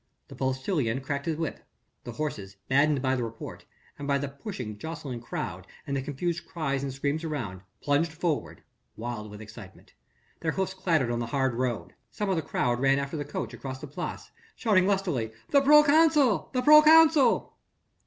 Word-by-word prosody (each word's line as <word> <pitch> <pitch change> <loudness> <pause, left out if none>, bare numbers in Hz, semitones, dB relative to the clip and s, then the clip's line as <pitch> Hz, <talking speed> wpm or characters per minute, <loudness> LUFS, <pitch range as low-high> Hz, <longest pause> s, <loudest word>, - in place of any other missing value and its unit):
The - - -10
postilion 130 - -1
cracked 140 +2 -4
his 160 -2 -1
whip. 165 -1 -3 0.5
The 120 - -6
horses, 105 -8 -5
maddened 140 0 +3
by 130 0 +2
the 125 - -1
report, 115 0 -8 0.3
by 140 0 0
the 140 +1 -3
pushing, 135 - -7
jostling 145 -6 -6
crowd - - -5 0.2
and 140 - -3
the 135 - 0
confused 165 +5 -3
cries 140 -5 -2
and 140 -1 -3
screams 140 +4 -2
around, 120 - -4 0.2
plunged 145 +3 +2
forward, 165 -1 -3 0.3
wild 110 -2 -5
with 105 +1 -10
excitement. 105 -3 -13 0.5
Their 160 -1 -1
hoofs 190 -1 -1
clattered 165 -10 +1
on 120 - -1
the 120 - -3
hard 135 -1 0
road. 115 -8 -2 0.2
Some 205 -2 -2
of - - +2
the 160 - 0
crowd 120 -5 -1
ran 135 +1 +3
after 140 +2 -3
the 145 - -2
coach 145 - -5
across 130 -1 -6
the 150 - -7
Place, 145 - -6 0.2
shouting 190 -5 +3
lustily: 175 - 0 0.2
"The 280 - +6
proconsul! 300 -3 +5
the 255 -1 -1
proconsul!" 305 0 +6
140 Hz, 175 wpm, -27 LUFS, 125-175 Hz, 0.5 s, The